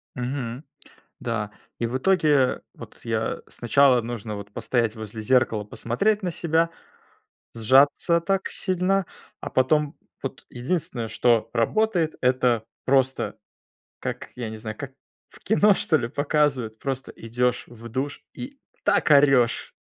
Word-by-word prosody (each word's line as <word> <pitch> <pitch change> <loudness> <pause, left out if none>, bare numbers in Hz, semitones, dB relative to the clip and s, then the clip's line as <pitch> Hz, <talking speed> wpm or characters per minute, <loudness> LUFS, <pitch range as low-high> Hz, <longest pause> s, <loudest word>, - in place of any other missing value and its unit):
Мгм. 125 0 -4 0.6
Да. 105 -3 -3 0.3
И 120 - 0
в 120 +3 -1
итоге, 180 +3 +2
э, 135 -3 +3
вот - - -12
я - - -2
сначала 125 +1 +3
нужно 115 -2 -5
вот 100 0 -8
постоять 115 0 0
возле 110 0 -7
зеркала, 115 -2 +2
посмотреть 195 - 0
на 180 - -1
себя, 165 0 +1 0.9
сжаться 135 +8 +4
так 195 +3 0
сильно. 185 0 +1 0.3
А - - -6
потом 150 +3 +2 0.3
вот - - -6
единственное, 125 -3 -2
что 115 -1 +2
работает, 170 - +1
это 125 -3 +2 0.2
просто, 130 0 +1 0.6
как, - - -5
я 120 -3 -4
не 110 - -7
знаю, 110 0 -6
как 135 -2 -7 0.4
в - - -15
кино, 210 0 +4
что 160 -4 +2
ли, 115 - -2
показывают. 140 -6 0
Просто 135 -1 -4
идешь 125 +2 -1
в 115 -1 -11
душ 135 +5 -3
и 275 +2 -8 0.3
так - - +2
орешь! 135 -4 +4
130 Hz, 135 wpm, -24 LUFS, 115-155 Hz, 0.9 s, сжаться